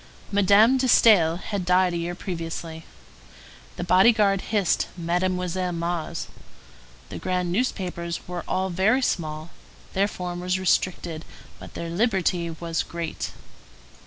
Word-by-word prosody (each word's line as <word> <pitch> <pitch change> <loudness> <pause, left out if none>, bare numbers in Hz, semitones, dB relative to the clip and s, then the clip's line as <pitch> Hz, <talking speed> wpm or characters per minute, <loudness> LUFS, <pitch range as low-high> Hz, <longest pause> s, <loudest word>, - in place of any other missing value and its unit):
Madame 205 +5 +5
de 260 - +1
Staël 180 -9 +5
had 200 -1 -4
died 180 0 +3
a - - -1
year 170 +1 -3
previously. 165 -3 -6 0.9
The - - -4
body 185 +6 +6
guard 200 -4 +2
hissed 205 -5 0
Mademoiselle 180 +1 -1
Mars. 170 -1 -3 0.8
The - - -7
grand 180 -1 -1
newspapers 180 -6 -2
were 180 -1 -5
all 190 0 -1
very 215 +9 +2
small. 155 -5 -2 0.4
Their 195 +1 +2
form 180 -3 -5
was 180 +1 0
restricted, 175 -3 0 0.4
but - - -12
their 170 0 -5
liberty 185 -4 +1
was 165 0 -3
great. 170 -1 -5
180 Hz, 130 wpm, -24 LUFS, 170-195 Hz, 0.9 s, body